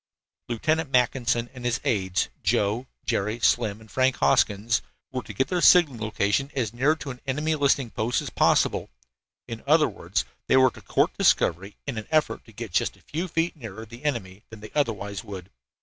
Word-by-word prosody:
Lieutenant 155 +6 0
Mackinson 125 -2 +1
and 125 -2 -10
his 120 -1 0
aides, 95 -4 0
Joe, 110 +6 +1 0.2
Jerry, 110 0 -1
Slim 110 -3 +2
and 110 -1 -17
Frank 130 0 +2
Hoskins, 100 - +2 0.3
were 125 - -3
to 110 - -10
get 105 +6 -1
their 180 -2 0
signaling 155 -12 +5
location 110 +4 0
as 115 -5 -1
near 135 +6 +2
to 145 -3 -6
an 125 - -11
enemy 150 +4 0
listening 140 -5 +1
post 115 +3 0
as - - -6
possible! - - +2 0.6
In 115 -1 -7
other 155 +1 +5
words, 110 - -3 0.2
they 130 - +4
were 130 -1 +6
to - - -14
court - - +1
discovery 95 +5 +2
in 130 -6 -3
an 110 - -9
effort 155 -1 +1
to 115 - -16
get 110 -1 -7
just - - 0
a - - -23
few 170 +5 -3
feet 165 +1 -1
nearer 110 -6 -8
the 120 +4 -13
enemy 105 -10 -3
than 110 -2 -11
they 110 - -10
otherwise 105 -8 -1
would. 95 -4 -9
120 Hz, 190 wpm, -25 LUFS, 105-140 Hz, 0.6 s, were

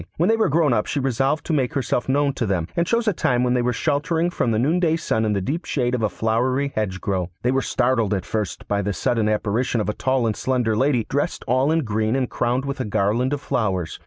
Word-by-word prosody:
When 175 +5 +2
they 225 - +4
were 220 -5 +2
grown 150 -3 +3
up 105 -2 0
she 145 - -1
resolved 135 +3 0
to 165 - -1
make 135 -4 0
herself 130 -2 -1
known 140 +1 +2
to 120 -4 -2
them, 90 -4 -1
and 170 0 +1
chose 230 +1 +1
a 215 - +3
time 125 -6 +1
when 125 0 +2
they 125 - +2
were 125 +1 +1
sheltering 160 +5 0
from 125 - 0
the 110 - +1
noonday 160 +6 +2
sun 110 -9 -1
in 105 - +1
the 100 - 0
deep 155 - -2
shade 125 -3 -1
of 125 - 0
a 110 - +1
flowery 125 +7 0
hedgerow. 95 -3 -2
They 125 - +2
were 135 +1 +1
startled 120 -6 +1
at 95 -2 -4
first 105 +1 -4
by 100 0 0
the 100 +1 -2
sudden 110 +4 0
apparition 110 +3 0
of 105 - -1
a - - 0
tall 130 +1 0
and 110 -2 0
slender 125 -3 0
lady, 125 -1 +1
dressed 145 +5 -2
all 130 +5 +2
in 165 0 +2
green, 110 +1 0
and 130 -2 0
crowned 125 +3 0
with 140 0 -4
a - - 0
garland 110 +5 0
of 145 -1 -2
flowers. 95 - -2
125 Hz, 250 wpm, -22 LUFS, 110-140 Hz, -, they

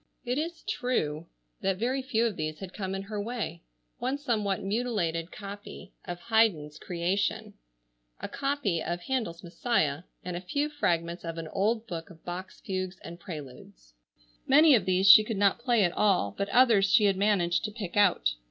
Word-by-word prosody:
It 250 +3 0
is 330 +1 -4
true 170 - -2 0.3
that 190 -1 0
very 255 +6 0
few 235 -3 +1
of 225 -4 -1
these 155 -2 -3
had 190 -2 -9
come 195 -2 -4
in 195 - -4
her 205 +1 -4
way. 210 -7 -4 0.4
One 255 +3 -1
somewhat 215 -9 -1
mutilated 195 -6 -1
copy 205 0 -9
of 175 0 -5
Handel's 220 -11 +1
"Creation," 180 +3 -2 0.7
a - - -4
copy 275 - -1
of 175 0 -3
Haydn's 220 -7 -3
"Messiah," 170 - 0 0.2
and 180 -1 -4
a 175 - -4
few 285 +11 -1
fragments 170 - -1
of 165 -1 -5
an 165 -1 -5
old 220 +5 0
book 170 -1 -6
of 165 -3 -16
Bach's 180 +2 -7
Fugues 185 -1 -4
and 170 +1 -9
Preludes. 130 - -10 0.5
Many 300 +3 +7
of 215 -8 +3
these 185 +1 +2
she 215 +2 +10
could 215 -1 -4
not 200 +2 +3
play 235 -3 +2
at 175 - +2
all, 185 - +2
but 200 - -2
others 225 -6 +5
she 215 -2 +5
had 200 -1 +3
managed 185 -4 +2
to 215 - -4
pick 205 -5 -6
out. 180 - +3
195 Hz, 180 wpm, -28 LUFS, 170-230 Hz, 0.7 s, she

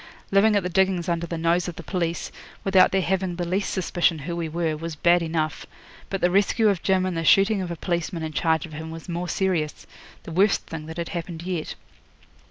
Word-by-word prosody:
Living 205 +2 +5
at 200 - +2
the - - -1
diggings 185 -1 +1
under 170 -1 -1
the 170 - -4
nose 170 +2 +1
of 175 - -5
the 170 - -8
police, 170 -1 -2 0.3
without 190 -1 +5
their 190 -1 +2
having 190 -1 0
the 175 0 -2
least 190 +4 -1
suspicion 175 -2 +1
who 170 0 -3
we 170 -2 -3
were, 165 -1 -1
was 165 +1 -5
bad 175 +3 +4
enough; 160 -2 -2 0.4
but 195 - -3
the 175 - +3
rescue 205 +3 +3
of 195 -4 0
Jim 190 -1 +2
and 185 -2 -2
the 165 - -1
shooting 195 +4 +4
of 180 - -4
a 170 - -3
policeman 170 0 -2
in 155 -1 -4
charge 160 0 +1
of 160 - -12
him 160 +2 -6
was 165 -1 -9
more 175 0 -3
serious 175 -6 -1 0.4
the - - -8
worst 195 +4 +2
thing 155 -1 -7
that 160 +1 -8
had 170 -1 -3
happened 170 -2 -5
yet. 175 -3 -3
175 Hz, 225 wpm, -24 LUFS, 165-190 Hz, 0.4 s, Living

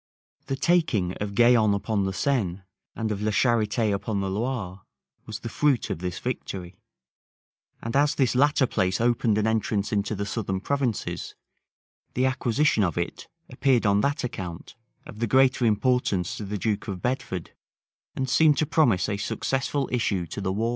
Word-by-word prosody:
[*] - - -45
The 135 - -1
taking 135 - +1
of 100 -1 -3
Gaillon 115 -3 +5
upon 100 0 -1
the 95 - -1
Seine, 95 -5 -1 0.3
and 110 -1 -2
of 100 -1 -3
La 105 - 0
Charité 110 -1 +2
upon 100 +1 -2
the 95 -1 -2
Loire, 100 -4 -3 0.5
was 110 0 -6
the - - -5
fruit 135 +2 +1
of - - -3
this 90 0 -4
victory: 95 -7 -5 1.0
and 115 +2 -4
as 145 +1 +3
this 130 -4 +2
latter 140 +1 +3
place 95 -6 0
opened 115 -2 +2
an 110 - +1
entrance 110 -2 0
into 105 +1 0
the 100 +1 -3
southern 100 -3 -2
provinces, 130 0 -2 0.8
the 130 - +2
acquisition 130 -1 +2
of 85 -4 -1
it 85 0 -4 0.2
appeared 130 -2 +1
on 100 0 +3
that 140 +3 0
account 95 -9 -6 0.3
of 105 - -11
the 115 - 0
greater 130 +1 +3
importance 105 -5 +1
to 105 - -5
the 105 +1 -3
duke 105 0 -2
of 95 -3 -5
Bedford, 120 -9 -3 0.6
and 130 - -2
seemed 150 +3 +4
to 155 - +2
promise 125 - +2
a 105 -1 -2
successful 135 +6 -1
issue 100 -7 0
to 95 - -6
the 95 -1 -1
war. 110 +4 0
110 Hz, 175 wpm, -25 LUFS, 100-130 Hz, 1.0 s, Gaillon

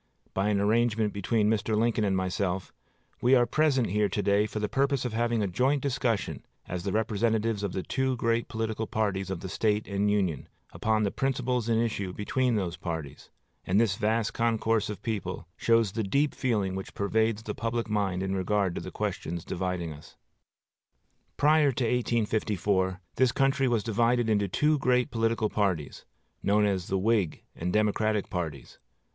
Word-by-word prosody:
By 95 +2 +1
an 100 -1 +2
arrangement 110 0 +2
between 105 +2 +1
Mr. 110 0 +1
Lincoln 115 0 +2
and 95 -2 +1
myself, 95 0 -2 0.5
we 125 +2 +5
are 120 -1 +5
present 135 - +2
here 105 0 +2
to 105 - -2
day 100 +1 +3
for 110 - -7
the 105 0 0
purpose 140 +3 +1
of 120 - -3
having 115 -1 +1
a - - 0
joint 130 +9 +1
discussion, 120 -6 -1 0.2
as 90 0 -4
the 100 +2 -2
representatives 110 0 0
of 100 -3 -3
the 95 - -2
two 130 -1 0
great 115 -1 0
political 110 -1 -3
parties 100 -3 -1
of 95 -3 -4
the 95 - -5
State 105 +2 0
and 100 0 0
Union, 95 -8 0 0.2
upon 110 -1 +1
the 100 - +1
principles 125 -3 -1
in 115 - +3
issue 100 -5 -1
between 125 +4 0
those 90 -5 -2
parties; 80 -5 -6 0.3
and 95 +3 +2
this 110 -4 +2
vast 110 +2 0
concourse 115 -2 +1
of 105 - -6
people 95 -6 -4
shows 115 -3 +2
the 110 - -2
deep 140 +9 +1
feeling 105 -8 0
which 95 0 -6
pervades 110 +2 0
the 105 - -4
public 115 +1 -2
mind 100 -4 0
in 95 0 -1
regard 95 -1 0
to - - -4
the - - -6
questions 85 0 -4
dividing 90 -3 -3
us. 75 +1 -14 1.2
Prior 150 -1 +4
to 125 - -1
1854, 105 -5 0 0.2
this 130 -1 +4
country 135 +1 +2
was 115 -4 +1
divided 115 +1 +2
into 100 -2 +2
two 150 - +2
great 125 -2 +2
political 115 -1 +1
parties, 95 -9 -1 0.4
known 105 +1 +3
as 95 -3 -1
the 95 - 0
Whig 100 -4 +1
and 90 +2 -3
Democratic 105 0 +1
parties. 80 -8 -5
105 Hz, 175 wpm, -28 LUFS, 95-115 Hz, 1.2 s, we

